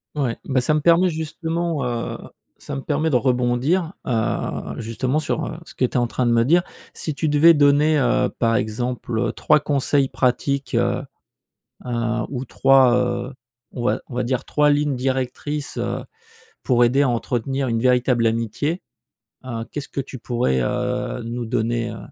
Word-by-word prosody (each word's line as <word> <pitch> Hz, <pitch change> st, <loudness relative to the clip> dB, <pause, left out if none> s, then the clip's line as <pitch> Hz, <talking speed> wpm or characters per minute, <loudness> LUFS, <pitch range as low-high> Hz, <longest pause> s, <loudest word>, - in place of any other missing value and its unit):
Ouais, 130 Hz, -5 st, -1 dB
bah, 130 Hz, -2 st, +1 dB
ça 155 Hz, +4 st, +2 dB
me -, -, +2 dB
permet 170 Hz, +3 st, +4 dB
justement, 160 Hz, -1 st, -2 dB
heu, 120 Hz, -1 st, -3 dB, 0.4 s
ça -, -, -6 dB
me 135 Hz, -, -4 dB
permet 155 Hz, +2 st, 0 dB
de 130 Hz, -, +1 dB
rebondir, 130 Hz, +8 st, +1 dB
heu, 115 Hz, -4 st, -2 dB
justement, 125 Hz, +5 st, -1 dB
sur, 155 Hz, 0 st, -1 dB
heu, 165 Hz, -, -6 dB
ce -, -, -12 dB
que 130 Hz, -, +1 dB
tu -, -, -5 dB
es -, -, +1 dB
en 120 Hz, -, +2 dB
train 120 Hz, +1 st, -1 dB
de -, -, +3 dB
me 115 Hz, 0 st, +3 dB
dire. 175 Hz, +5 st, +4 dB, 0.3 s
Si 155 Hz, -3 st, -4 dB
tu 155 Hz, -, -1 dB
devais 155 Hz, +3 st, +6 dB
donner, 145 Hz, +2 st, +4 dB
heu, 130 Hz, -3 st, +2 dB
par 115 Hz, -1 st, +2 dB
exemple, 120 Hz, +1 st, -2 dB
heu, 120 Hz, -, 0 dB
3 150 Hz, 0 st, +3 dB
conseils 140 Hz, -1 st, +1 dB
pratiques, 140 Hz, +2 st, 0 dB
heu, -, -, +1 dB, 0.9 s
heu, 125 Hz, -, -4 dB, 0.4 s
ou 130 Hz, -1 st, -4 dB
3, 135 Hz, -1 st, +4 dB
heu, 125 Hz, +1 st, -1 dB, 0.4 s
on 120 Hz, -, -5 dB
va -, -, +1 dB
on 125 Hz, -, -9 dB
va 125 Hz, -, 0 dB
dire 130 Hz, +2 st, -1 dB
3 150 Hz, 0 st, +2 dB
lignes 145 Hz, -1 st, +1 dB
directrices, 130 Hz, +3 st, -3 dB
heu, -, -, -3 dB, 0.6 s
pour 120 Hz, -1 st, +3 dB
aider 130 Hz, +4 st, +3 dB
à 140 Hz, -, +3 dB
entretenir 125 Hz, +3 st, -1 dB
une 115 Hz, -1 st, 0 dB
véritable 125 Hz, -1 st, +3 dB
amitié, 115 Hz, -, -1 dB, 0.6 s
heu, 115 Hz, -3 st, -4 dB
qu'est-ce 145 Hz, -1 st, -5 dB
que 140 Hz, -, -3 dB
tu 130 Hz, -1 st, -7 dB
pourrais, 120 Hz, -, 0 dB
heu, 125 Hz, -, -2 dB
nous 120 Hz, +1 st, -4 dB
donner, 115 Hz, 0 st, -1 dB
heu, 110 Hz, -, -7 dB
130 Hz, 180 wpm, -22 LUFS, 120-145 Hz, 0.9 s, devais